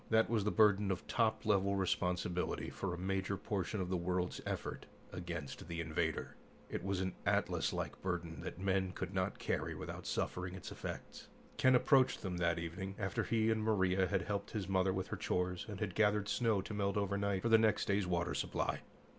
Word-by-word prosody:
That 110 Hz, 0 st, +4 dB
was 110 Hz, -3 st, +2 dB
the -, -, +3 dB
burden 105 Hz, -2 st, +4 dB
of 95 Hz, -2 st, -2 dB
top 110 Hz, -2 st, +1 dB
level 100 Hz, -1 st, +3 dB
responsibility 90 Hz, -1 st, 0 dB
for 100 Hz, -, -3 dB
a 85 Hz, -, -3 dB
major 95 Hz, +1 st, -1 dB
portion 100 Hz, +2 st, -2 dB
of 90 Hz, -1 st, -2 dB
the 90 Hz, -, +1 dB
world's 90 Hz, +1 st, -1 dB
effort -, -, -4 dB, 0.3 s
against 85 Hz, -5 st, -5 dB
the 85 Hz, 0 st, -4 dB
"invader." 80 Hz, -2 st, -1 dB, 0.4 s
It -, -, -3 dB
was 95 Hz, -1 st, 0 dB
an 95 Hz, -1 st, -1 dB
Atlas -, -, +1 dB
like -, -, -4 dB
burden 85 Hz, -3 st, -3 dB
that -, -, -6 dB
men 95 Hz, -1 st, +1 dB
could 95 Hz, -, -4 dB
not 95 Hz, +1 st, 0 dB
carry -, -, -1 dB
without -, -, -6 dB
suffering 90 Hz, 0 st, -2 dB
its 95 Hz, -, -7 dB
effects. -, -, -7 dB, 0.3 s
Ken 130 Hz, 0 st, +6 dB
approached 130 Hz, +1 st, +4 dB
them 90 Hz, -3 st, -2 dB
that 85 Hz, -1 st, +2 dB
evening, 85 Hz, +4 st, -4 dB
after 95 Hz, -2 st, -1 dB
he 115 Hz, -1 st, +2 dB
and 110 Hz, -1 st, +1 dB
Maria 95 Hz, -3 st, +2 dB
had 95 Hz, +1 st, 0 dB
helped 100 Hz, -1 st, -2 dB
his 105 Hz, -4 st, -3 dB
mother 95 Hz, 0 st, +2 dB
with 95 Hz, 0 st, -2 dB
her -, -, -3 dB
chores 90 Hz, 0 st, -1 dB
and 100 Hz, -2 st, -5 dB
had 105 Hz, -4 st, -2 dB
gathered 105 Hz, 0 st, +3 dB
snow 110 Hz, -5 st, +2 dB
to -, -, -6 dB
melt 100 Hz, -1 st, 0 dB
overnight 100 Hz, -1 st, 0 dB
for 115 Hz, -, +2 dB
their 115 Hz, -1 st, +7 dB
next 110 Hz, -2 st, +3 dB
day's 100 Hz, -2 st, +1 dB
water 85 Hz, -1 st, 0 dB
supply. -, -, -1 dB
95 Hz, 195 wpm, -36 LUFS, 90-105 Hz, 0.4 s, their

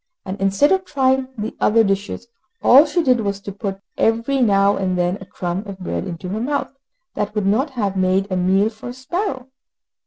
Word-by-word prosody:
And, 190 Hz, +1 st, -6 dB
instead 195 Hz, +9 st, +3 dB
of 380 Hz, 0 st, +2 dB
trying 265 Hz, -4 st, +1 dB
the 215 Hz, +1 st, -4 dB
other 225 Hz, +1 st, +4 dB
dishes, 200 Hz, +2 st, -2 dB, 0.4 s
all 280 Hz, +5 st, +7 dB
she 330 Hz, +3 st, 0 dB
did 250 Hz, -5 st, +3 dB
was 200 Hz, -2 st, -2 dB
to 200 Hz, -, -6 dB
put 195 Hz, -1 st, -5 dB, 0.2 s
every 230 Hz, +5 st, +1 dB
now 200 Hz, -3 st, +4 dB
and 185 Hz, -1 st, -1 dB
then 180 Hz, +2 st, 0 dB
a 195 Hz, -, -10 dB
crumb, 175 Hz, +1 st, -3 dB
of 195 Hz, -1 st, -7 dB
bread 190 Hz, +1 st, -4 dB
into 180 Hz, 0 st, -6 dB
her 210 Hz, +4 st, -3 dB
mouth, 280 Hz, +3 st, -2 dB, 0.4 s
that 210 Hz, +1 st, -3 dB
would 210 Hz, -2 st, 0 dB
not 230 Hz, +10 st, +2 dB
have 200 Hz, -4 st, -1 dB
made 190 Hz, +1 st, +2 dB
a -, -, 0 dB
meal 190 Hz, +3 st, +2 dB
for 220 Hz, +2 st, -9 dB
a -, -, -6 dB
sparrow. 260 Hz, 0 st, -4 dB
205 Hz, 205 wpm, -20 LUFS, 195-260 Hz, 0.4 s, all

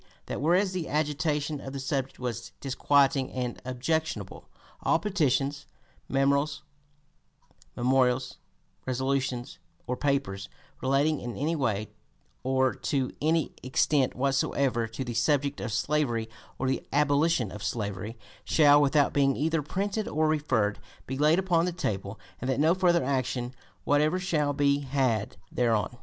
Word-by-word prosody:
That -, -, -4 dB
whereas 180 Hz, +5 st, +3 dB
the 180 Hz, -3 st, -3 dB
agitation 150 Hz, -1 st, -1 dB
of 135 Hz, -, -7 dB
the 140 Hz, -, -4 dB
subject 135 Hz, 0 st, -2 dB
was 120 Hz, -3 st, -5 dB
disquieting 135 Hz, 0 st, +2 dB
and 125 Hz, -2 st, -3 dB
objectionable, 155 Hz, +6 st, -2 dB, 0.3 s
"all -, -, +3 dB
petitions, 145 Hz, -8 st, 0 dB, 0.4 s
memorials, 140 Hz, +2 st, +2 dB, 2.3 s
resolutions 130 Hz, -1 st, -1 dB, 0.3 s
or 125 Hz, -, -2 dB
papers, 135 Hz, -9 st, -1 dB, 0.3 s
relating 140 Hz, +3 st, +2 dB
in 120 Hz, -1 st, -6 dB
any 155 Hz, +5 st, 0 dB
way 110 Hz, -7 st, -1 dB, 0.5 s
or 130 Hz, 0 st, +2 dB
to 135 Hz, -3 st, -1 dB
any 160 Hz, +1 st, +1 dB
extent 130 Hz, +1 st, +1 dB
whatsoever 135 Hz, -2 st, +1 dB
to 115 Hz, +4 st, -5 dB
the 120 Hz, -2 st, -5 dB
subject 140 Hz, +4 st, +1 dB
of 120 Hz, -, -3 dB
slavery 120 Hz, 0 st, 0 dB, 0.3 s
or 130 Hz, -, -1 dB
the 130 Hz, -, 0 dB
abolition 145 Hz, -, +2 dB
of 105 Hz, -, -8 dB
slavery, 105 Hz, +1 st, -3 dB, 0.3 s
shall, 145 Hz, -2 st, +5 dB
without 145 Hz, 0 st, +3 dB
being 135 Hz, -2 st, +3 dB
either 160 Hz, +2 st, 0 dB
printed 200 Hz, +8 st, -2 dB
or 155 Hz, +1 st, +1 dB
referred, 145 Hz, -10 st, +1 dB, 0.3 s
be 130 Hz, -, -4 dB
laid 150 Hz, +4 st, +4 dB
upon 175 Hz, -3 st, +2 dB
the 180 Hz, -, 0 dB
table, 110 Hz, -, -3 dB, 0.2 s
and 125 Hz, -, -3 dB
that 130 Hz, -, +1 dB
no 160 Hz, +3 st, +5 dB
further 180 Hz, -2 st, +3 dB
action 130 Hz, -2 st, -1 dB, 0.3 s
whatever 150 Hz, +4 st, +2 dB
shall 160 Hz, -6 st, 0 dB
be 140 Hz, 0 st, +2 dB
had 130 Hz, -6 st, 0 dB
(p. -, -, -21 dB
250) -, -, -26 dB, 0.2 s
thereon." 115 Hz, -1 st, +1 dB
140 Hz, 140 wpm, -28 LUFS, 125-150 Hz, 2.3 s, shall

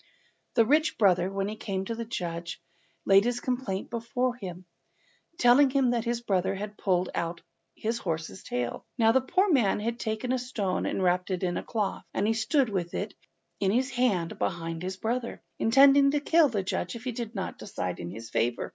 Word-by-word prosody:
The 230 Hz, -, +5 dB
rich 305 Hz, +6 st, +2 dB
brother, 185 Hz, -4 st, +3 dB
when 195 Hz, 0 st, -1 dB
he 210 Hz, -, -4 dB
came 195 Hz, -3 st, -3 dB
to 230 Hz, -, -3 dB
the 230 Hz, 0 st, -5 dB
judge, 170 Hz, -7 st, -4 dB, 0.5 s
laid 195 Hz, 0 st, +6 dB
his 245 Hz, +1 st, 0 dB
complaint 245 Hz, -7 st, -3 dB
before 245 Hz, +2 st, -1 dB
him, 185 Hz, -6 st, -8 dB, 0.7 s
telling 250 Hz, +3 st, +6 dB
him 260 Hz, -2 st, +2 dB
that 235 Hz, -1 st, -1 dB
his 235 Hz, 0 st, -1 dB
brother 190 Hz, -3 st, 0 dB
had 210 Hz, +2 st, -6 dB
pulled 185 Hz, -3 st, 0 dB
out 170 Hz, 0 st, -3 dB, 0.3 s
his 230 Hz, +2 st, -2 dB
horse's 160 Hz, -, -4 dB
tail. 120 Hz, -1 st, -3 dB
Now 225 Hz, -2 st, +5 dB
the 265 Hz, +3 st, +3 dB
poor 370 Hz, +9 st, +2 dB
man 235 Hz, -11 st, +3 dB
had 230 Hz, +3 st, -3 dB
taken 220 Hz, +3 st, -2 dB
a 260 Hz, -, +1 dB
stone 210 Hz, -7 st, -2 dB
and 190 Hz, -, -1 dB
wrapped 180 Hz, +1 st, +1 dB
it 185 Hz, -1 st, -2 dB
in 175 Hz, -1 st, 0 dB
a -, -, -1 dB
cloth, 215 Hz, -4 st, -2 dB
and 200 Hz, -, +1 dB
he 225 Hz, -, +3 dB
stood 230 Hz, +4 st, +2 dB
with 180 Hz, -4 st, -3 dB
it -, -, -3 dB, 0.5 s
in 195 Hz, -, +2 dB
his 255 Hz, +6 st, +1 dB
hand, 240 Hz, -10 st, 0 dB
behind 165 Hz, -2 st, -2 dB
his 185 Hz, +1 st, -4 dB
brother, 235 Hz, +4 st, -3 dB, 0.2 s
intending 275 Hz, +4 st, +6 dB
to 295 Hz, +1 st, +1 dB
kill 315 Hz, +1 st, +4 dB
the 205 Hz, -5 st, -1 dB
judge 185 Hz, -, -3 dB
if 230 Hz, -, -8 dB
he 255 Hz, -, -2 dB
did 235 Hz, -1 st, -6 dB
not 190 Hz, -, -4 dB
decide -, -, -4 dB
in 85 Hz, -, -5 dB
his 115 Hz, +4 st, -9 dB
favour. 120 Hz, +1 st, 0 dB
220 Hz, 200 wpm, -28 LUFS, 185-245 Hz, 0.7 s, laid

